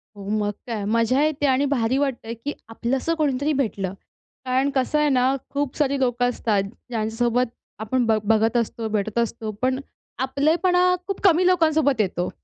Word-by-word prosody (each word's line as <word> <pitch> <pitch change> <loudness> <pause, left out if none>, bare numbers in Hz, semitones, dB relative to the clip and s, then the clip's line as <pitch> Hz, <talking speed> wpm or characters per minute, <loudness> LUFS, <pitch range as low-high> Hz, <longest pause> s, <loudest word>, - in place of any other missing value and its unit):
हो 200 -1 -9
मग 205 0 0 0.2
काय 225 -4 -3
मजा 230 +5 +2
येते 305 -2 0
आणि 265 +1 +3
भारी 245 0 +1
वाटतं 270 -5 -2
आहे 230 - -3
की 275 +6 -5 0.2
आपलंस 250 +6 -2
कोणीतरी 290 -1 +1
भेटलं. 205 -9 -1 0.5
कारण 260 +2 +1
कसं 265 +3 +1
आहे 300 0 +3
ना, 260 0 +3
खूप 285 -2 -2
सारी 280 -2 +1
लोकं 245 -1 +1
असतात 215 -5 0 0.3
ज्यांच्यासोबत 235 +2 0 0.3
आपण 240 +3 0
बघ 220 -1 +2
बघत 225 +2 +2
असतो 230 -1 -2
भेटत 215 +1 -2
असतो, 230 -1 -2
पण 260 +1 +1 0.4
आपलेपणा 315 +8 +2 0.2
खूप 395 - -3
कमी 365 -2 +5
लोकांसोबत 315 -8 +3
येतो. 180 -3 -1
255 Hz, 165 wpm, -23 LUFS, 225-285 Hz, 0.5 s, कमी